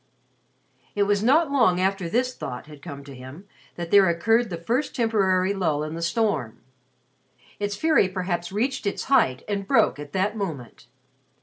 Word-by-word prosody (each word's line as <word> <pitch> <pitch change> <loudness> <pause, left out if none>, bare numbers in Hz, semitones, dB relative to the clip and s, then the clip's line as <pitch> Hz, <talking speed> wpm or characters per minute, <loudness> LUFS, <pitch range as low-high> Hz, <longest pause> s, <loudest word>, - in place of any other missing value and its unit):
It 205 - +3
was 205 0 +1
not 280 +6 +3
long 230 -10 +3
after 190 -2 0
this 250 +6 0
thought 125 - -7
had 150 -2 -13
come 140 -4 -8
to 140 0 -11
him 130 +9 -11 0.3
that 170 -1 -6
there 200 -3 +6
occurred 225 +7 +2
the 170 - -4
first 240 - -2
temporary 200 -6 +2
lull 160 -6 0
in 155 +1 -5
the 165 - -5
storm. 170 - -1 1.0
Its 205 0 -2
fury 310 -6 +3
perhaps 180 -2 -3
reached 240 +3 -1
its 200 - -2
height 130 - +2
and 200 -2 -3
broke 145 - +3
at 145 -1 -8
that 200 +3 0
moment. 160 - -6
190 Hz, 170 wpm, -24 LUFS, 165-220 Hz, 1.0 s, there